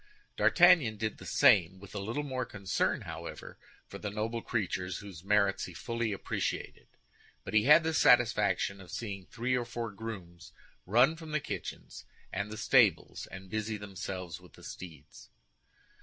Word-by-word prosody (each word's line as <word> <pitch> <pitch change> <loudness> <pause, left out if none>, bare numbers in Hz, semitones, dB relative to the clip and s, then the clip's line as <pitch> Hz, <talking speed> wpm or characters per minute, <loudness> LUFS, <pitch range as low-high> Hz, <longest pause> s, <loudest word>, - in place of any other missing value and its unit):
D'Artagnan 170 -11 +5
did 110 0 -3
the - - -10
same, 95 -2 +4
with 100 0 -13
a 100 - -3
little 115 +9 -3
more 130 -3 -2
concern, 100 -5 -1
however, - - -8 0.3
for - - -10
the 105 - -4
noble 110 +3 -3
creatures, 95 -6 -2
whose 95 -5 -10
merits 100 0 +2
he - - -10
fully 115 -2 -2
appreciated; 100 - -3 0.6
but 95 - -7
he 110 0 +4
had 150 +3 +7
the 160 0 0
satisfaction 105 -7 +3
of 90 - -13
seeing 100 -5 -6
three 125 +2 -1
or 125 - 0
four 120 -2 -5
grooms 100 -5 -8 0.3
run 125 - +5
from 160 -2 -9
the 150 - +2
kitchens - - -7 0.3
and 100 +2 -2
the 110 - -7
stables, 110 -7 +3
and 95 -1 -10
busy 110 0 -2
themselves 95 -4 -6
with - - -17
the - - -16
steeds. 80 -6 -11
105 Hz, 160 wpm, -31 LUFS, 95-120 Hz, 0.6 s, had